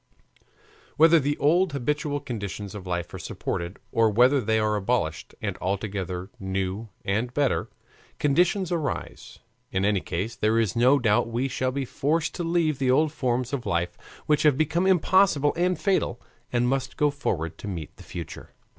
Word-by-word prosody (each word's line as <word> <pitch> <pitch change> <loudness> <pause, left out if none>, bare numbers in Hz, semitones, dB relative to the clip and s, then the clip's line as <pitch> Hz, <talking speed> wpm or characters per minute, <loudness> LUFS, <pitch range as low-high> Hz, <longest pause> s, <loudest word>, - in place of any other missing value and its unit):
Whether 165 +1 +7
the 145 +1 -1
old 170 +3 +3
habitual 145 +2 -1
conditions 105 -6 -5
of 100 -3 -8
life 85 -1 -3
are - - -6
supported, 85 +3 -4
or 115 -1 +3
whether 125 +6 +4
they 110 0 +1
are 110 -1 +1
abolished 100 -7 -1
and - - -2
altogether 95 -1 -3
new 95 +3 -3 0.2
and 110 +5 0
better 145 -2 +1 0.5
conditions 175 +6 +2
arise; 160 -5 -4 0.3
in 95 +1 0
any 105 -1 +2
case, 100 +7 -3
there 110 +1 +1
is 110 -5 +1
no 125 +4 +5
doubt 110 -5 +2
we 120 +3 -1
shall 130 -1 -1
be 135 0 -2
forced 155 +6 0
to 175 - -4
leave 165 -4 +1
the 130 -2 +1
old 150 +4 +3
forms 130 -3 -1
of 130 -3 -3
life 85 +1 -1 0.3
which 150 -1 +2
have 150 -4 +4
become 170 +4 +1
impossible 185 -5 +4
and 175 0 +1
fatal, 190 - 0 0.3
and 120 0 +2
must 135 +1 -1
go 150 -1 +3
forward 90 - -3
to - - -7
meet 85 -6 -6
the - - -12
future. 85 -3 -8
125 Hz, 170 wpm, -26 LUFS, 100-150 Hz, 0.5 s, Whether